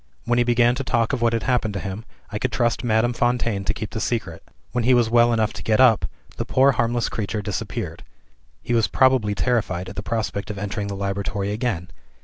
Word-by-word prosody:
When 120 0 +2
he - - +5
began 120 0 +3
to 135 +2 -3
talk 115 -1 0
of 130 - -1
what 115 -1 +3
had 115 - 0
happened 120 -5 0
to - - -1
him, 100 +4 -6 0.3
I 105 - -3
could 130 - -1
trust 120 -1 0
Madame 120 +1 +2
Fontaine 120 -4 0
to - - +1
keep 110 -2 -5
the 110 - -4
secret. 110 -9 -2 0.3
When 125 -1 -1
he 125 +2 +5
was 120 -2 +2
well 120 0 +5
enough 110 -2 +1
to - - -8
get 110 +1 +2
up, 125 -4 +5 0.3
the - - -1
poor 135 +2 +4
harmless 120 -2 0
creature 105 0 -3
disappeared. - - -4 0.6
He 120 - -2
was 115 -2 +3
probably 130 -6 +3
terrified 100 -7 -1
at - - -9
the - - -3
prospect 105 -1 -3
of 105 - -5
entering 100 +1 -3
the 100 - -4
laboratory 100 +1 -2
again. 105 -6 -2
115 Hz, 220 wpm, -23 LUFS, 105-120 Hz, 0.6 s, he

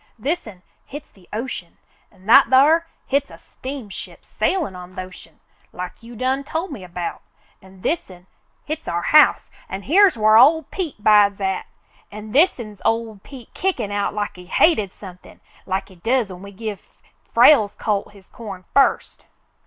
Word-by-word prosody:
"This'n, 215 - -4 0.2
hit's 290 +2 -10
the 185 -3 -23
ocean, 215 -6 -6 0.3
an' 185 - -22
that 270 +6 +7
thar, 310 +6 +5 0.2
hit's 280 +1 0
a - - -12
steamship 260 -7 -9
sailin' 325 - -1
on 180 0 -11
th' - - -19
ocean, 185 -1 -10 0.3
like 180 +4 -8
you 235 +1 -12
done 260 +4 -1
tol' 325 +6 -4
me 235 - -8
about. 175 -1 -6 0.4
An' 190 0 -17
this'n, 185 - -3 0.4
hit's 310 +1 -5
our 170 0 -2
house 305 0 +4 0.2
an' 195 +1 -6
here's 370 - +4
whar 215 0 +5
ol' 320 +6 +6
Pete 305 - -6
bides 205 -2 +5
at; 190 -1 -2 0.4
an' 210 +1 -9
this'n's 240 - +1
ol' 225 -2 -1
Pete 260 -5 -13
kickin' 255 - -2
out 205 0 -2
like 205 -3 -3
he 180 0 -13
hated 215 - +2
somethin' 185 -3 -13 0.3
like 190 +2 -2
he 190 - -17
does 230 +3 0
when 180 0 -10
we 200 0 -10
give 210 0 -6 0.5
Frale's 230 -4 +5
colt 205 -2 -2
his 200 -2 -18
corn 195 -5 -10
first." 275 -1 +1
215 Hz, 160 wpm, -21 LUFS, 190-275 Hz, 0.5 s, that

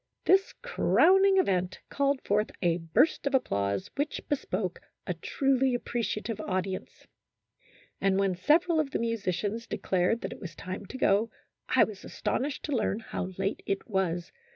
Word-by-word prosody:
This 385 +1 +4
crowning 390 -5 +4
event 185 - +1
called 280 -1 +1
forth 210 +1 +1
a 170 0 +2
burst 165 - +2
of 280 - +2
applause 100 - 0
which 290 +1 -1
bespoke 185 -10 -2 0.3
a 180 - -1
truly 265 - +1
ap 245 - -4
preciative 225 -2 -2
audience, 185 0 -4 1.0
and 195 -1 +3
when 195 -1 +2
several 320 - +3
of 300 -3 0
the - - -1
musi 230 -3 -2
cians 210 +6 -2
declared 185 +5 0
that - - -4
it - - -13
was 170 -6 -8
time 185 +2 -6
to 260 - -7
go, 215 -1 +3 0.4
I - - +5
was 205 -3 -5
astonished 275 +3 -2
to 295 - -1
learn 215 -3 0
how 220 - -4
late 195 +2 -1
it 195 0 -2
was. 180 -5 -1
210 Hz, 160 wpm, -29 LUFS, 185-275 Hz, 1.0 s, I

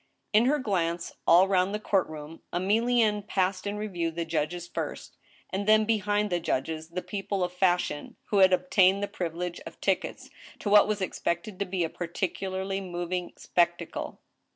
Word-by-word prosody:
In 215 +3 +6
her 290 +4 +3
glance 175 - -1
all 180 +3 +7
round 190 +1 +2
the - - -2
court 195 -3 +1
room, 155 +1 -9
Emilienne 215 +3 +2
passed 185 0 0
in 205 +1 -2
re 210 - -3
view 175 -5 -2
the 165 +1 -4
judges 165 +2 -2
first, - - -5 0.4
and 195 +2 -2
then 215 0 +6
behind 210 -2 +1
the 175 - +1
judges 160 0 -2
the 180 +2 -4
people 195 +1 -2
of 180 0 -2
fashion, 180 -4 0 0.2
who 205 - +3
had 190 -1 +7
obtained 185 +2 +4
the - - 0
privilege 175 -1 -4
of - - -11
tickets - - -1 0.3
to 205 - -3
what 210 0 +7
was 210 -2 -1
ex - - -4
pected 175 +3 -2
to 200 - 0
be 180 -1 -1
a - - +1
particularly 190 +2 -3
moving 175 -1 -4
spectacle. 175 -1 -1
185 Hz, 175 wpm, -28 LUFS, 175-205 Hz, 0.4 s, all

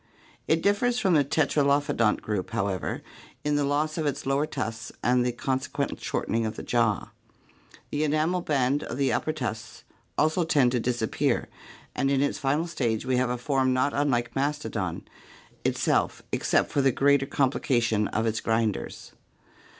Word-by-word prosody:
It 160 +1 +2
differs 235 +5 +2
from 190 -7 +2
the 150 -3 +5
tetralophodont 140 -5 +2
group, 105 -4 -2
however, 95 -2 -2 0.4
in 150 0 +1
the 145 - +2
loss 150 +3 0
of 155 - 0
its 140 - -3
lower 140 +3 +1
tusks 115 -6 -4
and 125 +1 +3
the 125 - +1
consequent 135 +3 -2
shortening 115 +1 -1
of 110 0 -3
the - - -7
jaw. 115 -4 0 0.8
The 150 +1 0
enamel 155 +4 +1
band 140 -2 +1
of - - -5
the 140 -1 +1
upper 155 - 0
tusks 115 -8 -5 0.3
also 155 +3 +2
tends 140 -6 +3
to 125 - +1
disappear 120 -2 0 0.4
and 135 - 0
in 140 -1 +2
its 145 - -1
final 145 +4 +1
stage 120 -10 -1
we 130 -1 +1
have 125 -1 +1
a 125 - -1
form 130 0 +1
not 130 +3 +1
unlike 130 -5 0
Mastodon 135 - -2 0.6
itself - - +1
except - - +1
for 140 - +2
the 135 -1 +4
greater 140 +1 +3
complication 120 -6 +1
of 110 +1 -1
its 110 0 0
grinders. 110 -2 -1
135 Hz, 160 wpm, -27 LUFS, 120-145 Hz, 0.8 s, the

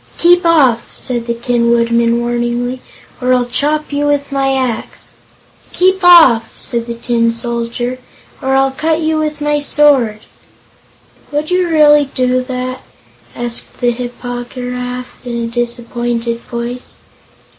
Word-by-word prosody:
"Keep 350 0 +4
off!" 270 -8 +3
said 240 -2 -1
the 235 - -1
Tin 235 0 0
Woodman, 235 0 +2
warningly, 240 +1 -2 0.4
"or 255 0 +3
I'll 250 -1 +1
chop 300 +4 -1
you 290 +1 0
with 285 -1 0
my 270 -1 +1
axe." 250 -4 -3 0.6
"Keep 375 +1 +2
off!" 290 -11 +6
said 235 -1 -1
the 235 - -4
Tin 235 0 0
Soldier, 235 +1 -2 0.4
"or 265 -1 0
I'll 270 0 +3
cut 315 +4 -1
you 315 0 0
with 305 -1 -3
my 295 0 +1
sword." 275 -7 +3 1.1
"Would 295 +3 -2
you 360 -1 +1
really 295 -2 +5
do 255 -1 +1
that?" 255 0 -5 0.5
asked 240 -1 -5
the 245 -1 +2
Hip 245 0 -6
po 245 -1 -5
gy 245 0 -7
raf, 250 0 -6
in 240 -1 -4
a 235 - -2
disappointed 235 0 -2
voice. 240 +1 -6
250 Hz, 145 wpm, -14 LUFS, 235-290 Hz, 1.1 s, off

